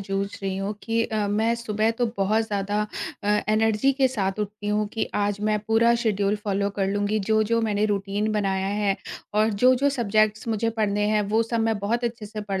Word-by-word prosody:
जूझ 195 0 -2 0.2
रही 190 -1 -2
हूँ 195 +2 -2
कि 230 0 0
अ, 215 -2 -1
मैं 220 +3 +1
सुबह 220 -1 0
तो 240 +1 0
बहुत 205 +3 +2
ज़्यादा 205 0 -1 0.4
अ, - - -1 0.2
एनर्जी 220 +4 +3
के 265 -1 +2
साथ 195 -6 -2
उठती 210 0 -5
हूँ 210 0 +1
कि 225 - -1
आज 205 0 0
मैं 210 0 +1
पूरा 230 +1 +4
शेड्यूल 205 -2 +1
फॉलो 200 -1 0
कर 195 -1 -1
लूँगी, 205 +2 0
जो-जो 220 +2 +1
मैंने 210 -1 +1
रूटीन 205 +1 -1
बनाया 195 -2 0
है 200 0 0 0.4
और 215 +1 +3
जो-जो 255 +6 +3
सुबजेक्ट्स 215 -4 +1
मुझे 225 +1 0
पढ़ने 210 -2 0
हैं 215 -1 +2
वो 220 +2 +3
सब 230 0 -2
मैं 225 -2 +1
बहुत 230 +5 -1
अच्छे 230 -2 -3
से 215 +1 -6
पढ़ 200 -2 -3
210 Hz, 200 wpm, -24 LUFS, 200-225 Hz, 0.4 s, पूरा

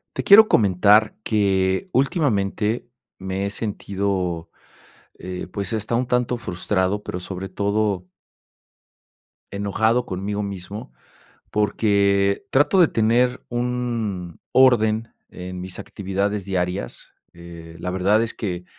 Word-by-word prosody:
Te - - -3
quiero 215 +2 +8
comentar 105 +1 +4
que 95 - +1
últimamente 115 - 0 0.3
me 95 +1 -3
he - - -2
sentido, 95 -5 -3 0.7
eh, 90 0 -6
pues 100 -1 -3
está 110 +1 -1
un 125 +1 0
tanto 125 0 0
frustrado, 95 0 -1
pero 90 - -5
sobre 95 +1 -6
todo 100 -2 -1 1.4
enojado 110 +4 +1
conmigo 100 +3 -3
mismo 100 - -7 0.6
porque 100 -2 +1
trato 145 +8 +3
de 175 - +7
tener 120 +3 +1
un 120 -8 -3
orden 115 -4 +4 0.2
en 90 0 -7
mis 90 0 -7
actividades 100 +1 -3
diarias. 90 -7 -3 0.2
Eh, 85 -1 -11
la 90 - -3
verdad 95 +4 +2
es 115 - -2
que 90 -5 -4
100 Hz, 110 wpm, -22 LUFS, 95-115 Hz, 1.4 s, quiero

